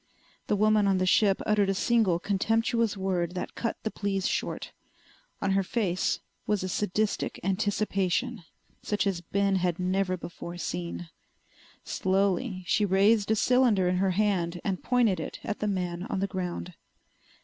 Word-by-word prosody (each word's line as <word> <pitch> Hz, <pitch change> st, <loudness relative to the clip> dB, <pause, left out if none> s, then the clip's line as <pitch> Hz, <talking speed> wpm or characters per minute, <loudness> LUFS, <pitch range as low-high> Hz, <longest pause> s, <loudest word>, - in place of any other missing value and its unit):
The -, -, +2 dB
woman 215 Hz, 0 st, +3 dB
on 195 Hz, -1 st, +3 dB
the 185 Hz, -, +1 dB
ship 195 Hz, +1 st, +3 dB
uttered 210 Hz, -2 st, +2 dB
a 195 Hz, -, +1 dB
single 215 Hz, -4 st, +2 dB
contemptuous 225 Hz, +3 st, +1 dB
word 185 Hz, -2 st, -1 dB
that 180 Hz, -, -4 dB
cut 230 Hz, -, -2 dB
the 220 Hz, -, -2 dB
pleas 195 Hz, -2 st, -1 dB
short. -, -, -3 dB, 0.7 s
On 195 Hz, -, +1 dB
her 195 Hz, 0 st, +3 dB
face 190 Hz, -2 st, -1 dB, 0.3 s
was 210 Hz, -3 st, +1 dB
a 185 Hz, -, -2 dB
sadistic 210 Hz, +2 st, -1 dB
anticipation 205 Hz, +3 st, 0 dB, 0.4 s
such 210 Hz, 0 st, -1 dB
as 190 Hz, -3 st, -1 dB
Ben 195 Hz, +2 st, +1 dB
had 175 Hz, -2 st, 0 dB
never 185 Hz, 0 st, 0 dB
before 170 Hz, 0 st, -8 dB
seen. 85 Hz, -, -4 dB, 0.7 s
Slowly 190 Hz, +1 st, 0 dB
she 210 Hz, -, +2 dB
raised 200 Hz, +2 st, +3 dB
a 220 Hz, -, +4 dB
cylinder 235 Hz, -5 st, +3 dB
in 180 Hz, 0 st, +1 dB
her 190 Hz, +1 st, +2 dB
hand 180 Hz, -5 st, +1 dB
and 190 Hz, -2 st, -2 dB
pointed 235 Hz, -8 st, +2 dB
it -, -, -6 dB
at 210 Hz, -, -3 dB
the 210 Hz, -, -1 dB
man 180 Hz, -2 st, -2 dB
on -, -, -2 dB
the 195 Hz, -, +1 dB
ground. 180 Hz, -2 st, -4 dB
195 Hz, 160 wpm, -28 LUFS, 180-210 Hz, 0.7 s, a